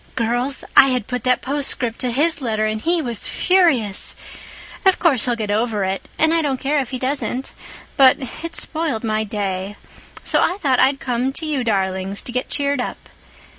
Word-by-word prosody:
Girls, 245 +3 0
I 270 - +9
had 250 -5 0
put 250 -1 -4
that 250 0 +2
postscript 260 -4 -2
to 250 - 0
his 295 +6 +1
letter 220 -3 0
and 215 0 -2
he 335 +2 +1
was 235 -4 -1
furious. 275 - +2 0.7
Of 380 -2 +4
course 275 - +2
he'll 245 -2 +1
get 215 -3 -3
over 215 -1 0
it—and 195 +11 -1
I 330 - +3
don't 275 -4 -1
care 290 +2 +1
if 260 -3 -3
he 260 - -4
doesn't—but 265 0 0 0.3
it 335 0 -5
spoiled 310 -9 -2
my 215 -1 0
day. 200 -2 -3 0.5
So - - +2
I 365 - +1
thought 270 -9 +1
I'd 270 +1 +3
come 250 +1 -1
to 320 - -3
you 290 -5 -1
darlings 195 -2 -1
to - - -6
get 250 +1 -2
cheered 280 -2 0
up. - - -6
250 Hz, 180 wpm, -20 LUFS, 220-285 Hz, 0.7 s, I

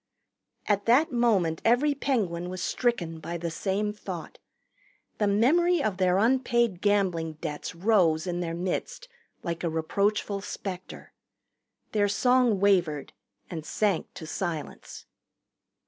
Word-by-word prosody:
At 205 -1 +1
that 265 +7 +4
moment 205 -10 +2
every 255 +6 +3
Penguin 195 -12 -1
was 185 -1 -5
stricken 175 -10 -1
by 170 +2 -5
the 170 0 -4
same 200 +4 -1
thought. 185 -5 -8 0.8
The 210 - +2
memory 305 - +3
of 205 -6 -1
their 185 -1 +3
unpaid 235 -3 +2
gambling 185 -6 +1
debts 155 0 -6
rose 175 -4 +3
in 175 -1 -2
their 165 -1 -3
midst 190 - -3 0.4
like 170 0 -4
a 170 - +1
reproachful 200 +5 0
specter. 190 -2 -7 0.8
Their 205 -1 +2
song 245 0 +3
wavered 175 -7 +2 0.3
and 160 -3 -6
sank 200 +2 -1
to 160 - -7
silence. 165 -1 -5
195 Hz, 125 wpm, -27 LUFS, 170-230 Hz, 0.8 s, that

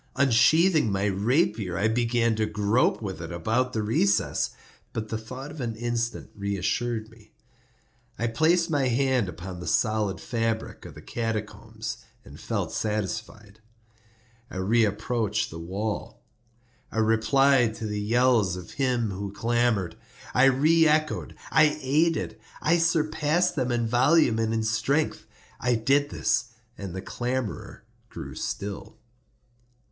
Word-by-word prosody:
Unsheathing 140 - +4
my 100 +1 0
rapier, 105 - +1
I 105 - +2
began 115 0 +1
to 110 -1 +1
grope 105 +3 +1
with 95 -4 -5
it 80 - -6
about 110 +9 0
the 110 - -1
recess; 105 -1 +1 0.4
but 110 -1 -4
the 110 - -2
thought 130 +6 -8
of 150 - -8
an 115 -2 -3
instant 120 0 -3
reassured 105 +3 -2
me. 115 -2 -20 0.8
I 115 - -1
placed 160 +9 +2
my 140 -4 +2
hand 125 -4 +1
upon 90 +2 -8
the 90 - -7
solid 105 -3 +1
fabric 115 -2 -3
of - - -12
the - - -12
catacombs, 115 -3 -4 0.3
and - - -12
felt - - -2
satisfied. 105 0 -4 0.9
I - - -10
reapproached 110 +2 0
the 80 - -7
wall. 95 - -4 0.7
I - - -7
replied 115 +2 +3
to 115 - -6
the 105 -1 -3
yells 115 -3 +3
of 90 -1 -9
him 125 -5 0
who 100 +1 -5
clamored. 115 -5 0 0.4
I 125 - +5
re 155 +5 +4
echoed—I 155 0 +1
aided—I 150 +1 0
surpassed 165 +1 +1
them 130 -4 0
in 120 -1 0
volume 125 +1 +3
and 110 0 0
in 115 -1 0
strength. 125 +8 0 0.3
I 125 0 +1
did 140 +6 +2
this, 125 - 0 0.3
and 95 -2 -7
the 95 - -5
clamorer 125 -1 -4 0.3
grew - - -8
still. 100 - -5
115 Hz, 130 wpm, -26 LUFS, 105-130 Hz, 0.9 s, I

